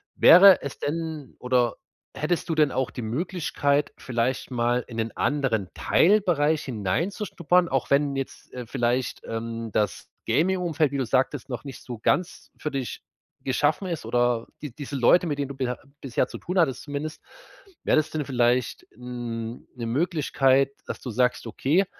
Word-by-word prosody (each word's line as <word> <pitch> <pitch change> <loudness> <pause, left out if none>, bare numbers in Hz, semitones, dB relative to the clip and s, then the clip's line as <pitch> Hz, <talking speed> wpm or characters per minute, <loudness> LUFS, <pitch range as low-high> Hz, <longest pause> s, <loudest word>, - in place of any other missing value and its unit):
Wäre 185 +1 +8
es 140 - -6
denn, 160 -1 -4
oder 125 -2 +1 0.4
hättest 165 +3 -1
du 165 - +1
denn 150 -3 +3
auch 130 -1 -1
die - - -7
Möglichkeit, 145 +2 -1
vielleicht 125 +1 -2
mal 120 0 +1
in 115 - -8
'nen 115 0 -1
anderen 130 -9 0
Teilbereich 160 - +3
hineinzuschnuppern? 170 - 0
Auch 135 -2 -1
wenn 140 0 +3
jetzt, 135 -1 -6
äh, 125 -1 -6
vielleicht, 120 +2 -1
ähm, 115 0 -4
das 105 -1 -1 0.2
Gaming-Umfeld, 170 -3 +1
wie 140 - -2
du 135 - 0
sagtest, 130 +3 0
noch 125 +2 -5
nicht 135 -4 -9
so 120 -3 -7
ganz 180 +10 -1
für 150 - -4
dich 135 -3 -4 0.4
geschaffen 145 +7 +1
ist, 170 -4 -4
oder 120 -1 +1 0.2
die 145 -5 -6
diese 145 +1 -7
Leute, 155 +8 +4
mit 145 -3 -2
denen 140 -1 -2
du 140 - -7
beher 125 -2 -2 0.2
bisher 130 -4 0
zu - - -8
tun 180 +2 -4
hattest 160 -8 +2
zumindest. 150 +1 -5 0.6
Wäre - - +3
das 155 - +2
denn 155 -2 -3
vielleicht 125 -2 +1
n 120 -1 -6
'ne 120 -2 -5
Möglichkeit, 135 -1 +2 0.2
dass - - -5
du 125 - -5
sagst: 125 +2 +1
„Okay, 145 - +1
135 Hz, 165 wpm, -25 LUFS, 120-155 Hz, 0.6 s, Wäre